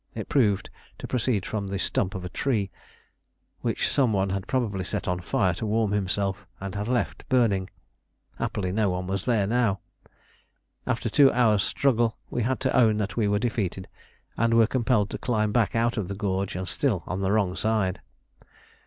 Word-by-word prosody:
It - - -5
proved 105 -8 +2 0.3
to - - -7
proceed 120 -5 0
from 105 -2 -3
the 100 0 -3
stump 95 0 -1
of 95 -1 -5
a - - -4
tree 105 -3 -1 0.9
which - - 0
some 130 -6 +2
one 95 -1 +1
had 95 0 -3
probably 110 -8 -1
set - - -3
on 90 -1 0
fire 95 0 +1
to 95 - -4
warm 110 -1 +1
himself 100 -1 -1
and 95 -1 -5
had 105 +1 -3
left 125 -1 -2
burning: 105 -7 +2 0.7
happily 95 -3 -2
no 105 +1 +1
one 90 0 -2
was 95 +1 -3
there 115 -5 +2
now. 115 -2 +1 1.1
After - - -1
a - - -3
two 140 -2 +6
hours' 110 -5 +3
struggle 120 -1 +1
we 120 - -1
had 130 +3 0
to 130 - 0
own 115 -5 +5
that 105 -1 -2
we 110 -3 +1
were 105 0 +2
defeated, 100 -5 -2 0.5
and 115 0 +2
were 115 -1 +6
compelled 115 -3 +1
to - - -4
climb 110 -4 0
back 115 -1 +1
out 115 +1 +1
of 105 -5 -1
the 100 - -4
gorge 95 -2 -2
and 95 0 -4
still 110 - 0
on 95 +1 -3
the 95 0 +1
wrong 100 -4 +1
side. 105 -4 0
105 Hz, 190 wpm, -26 LUFS, 95-115 Hz, 1.1 s, two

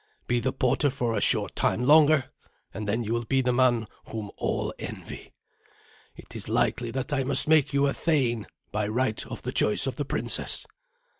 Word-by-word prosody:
Be 120 0 0
the 130 +2 -1
porter 130 +3 +1
for 125 -3 -2
a - - -1
short - - +1
time 120 - 0
longer, 150 0 +5 0.4
and 105 +1 -5
then 110 +3 0
you 110 +1 -2
will 120 0 -2
be 135 +3 +1
the 125 -1 0
man 120 -3 +2 0.2
whom 110 -3 -6
all - - -2
envy. - - -8 0.8
It - - -14
is - - -5
likely 120 -1 0
that 135 +5 -4
I 135 -2 +1
must 135 +2 +5
make 155 -3 +4
you 140 0 +2
a 140 - +1
thane, 125 -9 0 0.2
by 105 0 -1
right 110 0 -1
of - - -8
the - - -3
choice 105 - +2
of 135 - -3
the 145 - -2
princess." - - +1
125 Hz, 195 wpm, -26 LUFS, 115-140 Hz, 0.8 s, longer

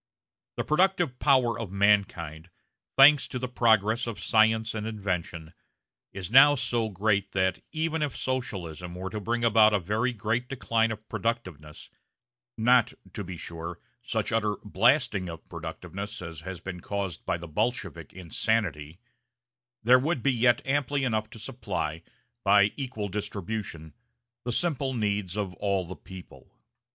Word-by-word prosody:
The - - 0
productive 175 -4 +2
power 130 -5 +3
of 110 -5 -5
mankind, 95 -5 +1 0.5
thanks 140 +1 +7
to - - -5
the 125 0 -3
progress 115 -2 +2
of 115 -3 -5
science 110 0 +3
and 110 0 -3
invention, 90 -6 -4 0.6
is 95 0 -6
now 140 +3 +8
so 120 -4 -1
great 100 0 0
that, 95 -1 +1
even 160 0 -1
if 150 -3 -2
Socialism 90 -9 -4
were 95 +1 -5
to 110 - -3
bring 115 +3 -2
about 110 -2 +5
a - - +2
very 105 +8 0
great 115 +2 -2
decline 115 -4 +1
of 110 -1 -7
productiveness 95 - -4 0.7
not, 120 +1 +4 0.2
to 105 - -4
be 90 -1 -7
sure, 85 +1 -7 0.2
such - - -2
utter 105 -2 +1
blasting 110 - +2
of 85 -1 -9
productiveness 90 +6 -7
as 85 -4 -8
has 90 +1 -7
been 90 -1 -6
caused 100 -2 -4
by - - +1
the 85 0 -9
Bolshevik 105 - -2
insanity 85 -3 -2 0.8
there 125 +3 +7
would 145 -1 -1
yet 125 -2 +3
be - - -8
amply 145 0 0
enough 110 -4 0
to - - -11
supply, 100 -8 -4 0.4
by 100 0 +5
equal 125 -7 -4
distribution, 100 -4 -5 0.5
the 125 - -1
simple 135 -2 -1
needs 100 -3 -1
of 100 -3 -2
all 100 -2 0
the 95 +2 -7
people. 90 -8 -13
105 Hz, 145 wpm, -27 LUFS, 90-120 Hz, 0.8 s, now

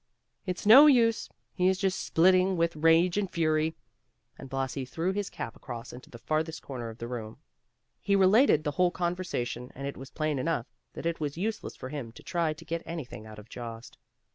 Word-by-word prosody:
"It's 180 +1 -3
no 265 +8 +10
use; 230 -5 +3 0.2
he 180 -1 +2
is 190 0 +3
just 190 -1 0
splitting 185 +2 +4
with 170 0 +1
rage 165 +4 +4
and 195 -2 -2
fury;" 160 -1 +1 0.6
and 135 - -11
Blasi 135 0 -2
threw 165 +8 -2
his 200 0 -3
cap - - -6
across 120 -3 -8
into 125 +1 -12
the 120 - -11
farthest 155 +5 -2
corner 120 -4 -6
of 110 - -10
the 115 - -6
room. 115 -3 -6 0.6
He 200 - +2
related 195 - +5
the 150 - -1
whole 180 +4 +3
conversation 175 -9 -3
and 140 - -6
it 140 - -5
was 135 - -9
plain 155 -3 -1
enough 145 -4 -1 0.3
that - - -8
it 170 0 -1
was 150 -1 -3
useless 215 +4 -3
for 130 - -8
him 135 -6 -6
to - - -14
try 170 -3 0
to 155 +2 -9
get 165 0 -3
anything 125 -11 -7
out 110 -1 -11
of 105 +1 -12
Jost. 115 0 -8
160 Hz, 200 wpm, -29 LUFS, 130-180 Hz, 0.6 s, no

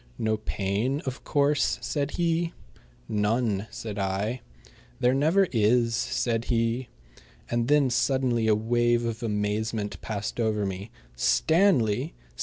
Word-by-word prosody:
"No 110 0 0
pain, 105 +6 -1
of 130 0 -5
course?" 145 0 +2
said 145 -1 -2
he. 170 -1 0 0.5
"None," 105 -1 0
said 105 -2 -6
I. 100 +5 -1 0.6
"There 125 +1 +3
never 160 +8 +3
is," 115 +1 +3
said 115 -1 -1
he. 115 +1 0 0.6
And 120 0 +1
then 145 -2 +4
suddenly 125 -3 +1
a 110 - +5
wave 120 +2 +1
of 115 0 -3
amazement 105 0 -2
passed 105 +1 -4
over 110 -3 +1
me. 95 +2 -5 0.3
Stanley! 130 - +2
115 Hz, 120 wpm, -27 LUFS, 105-130 Hz, 0.6 s, a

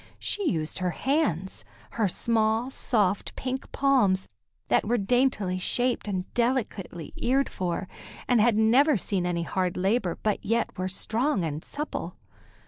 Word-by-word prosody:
She 405 -5 -1
used 155 0 -2
her 185 -1 0
hands, 225 - -1 0.3
her 220 -3 +1
small, 225 +5 +1
soft, 205 -7 0
pink 260 +1 -4
palms, 240 -9 +2 0.4
that - - +3
were 240 +2 +2
daintily 210 -4 +1
shaped 245 +5 +1
and 185 -3 -2
delicately 230 - -1
eared 270 +3 +1
for, 180 0 -3 0.4
and 245 -3 +4
had 230 0 +4
never 250 +6 +5
seen 185 -1 -1
any 170 -1 -1
hard 180 +1 -1
labor, 190 -1 +1
but 210 -2 0
yet 230 +2 0
were 185 0 -2
strong 220 - 0
and 155 0 -4
supple. 300 +1 -5
215 Hz, 140 wpm, -27 LUFS, 185-250 Hz, 0.4 s, never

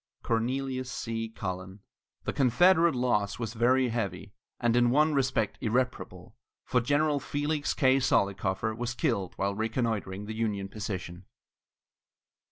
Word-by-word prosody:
CORNELIUS 130 +3 -1
C. 115 -1 -3
CULLEN. 95 -2 -6 0.4
The - - -2
Confederate 170 +5 +4
loss 120 -5 0
was 115 -3 -4
very 125 +2 +3
heavy, 100 -5 -3 0.3
and 120 -1 +2
in 120 0 +4
one 150 +4 +3
respect 130 -6 0
irreparable, 125 +3 -2 0.3
for 125 - +2
General 145 +3 +2
Felix 145 +1 -2
K. 135 -2 +4
Zollicoffer 100 -3 +1
was 120 +1 -3
killed 115 - -1
while 100 +1 -1
reconnoitring 110 -3 -2
the 110 - -5
Union 105 -3 -2
position. 95 -4 -6
115 Hz, 125 wpm, -29 LUFS, 100-130 Hz, 0.4 s, Confederate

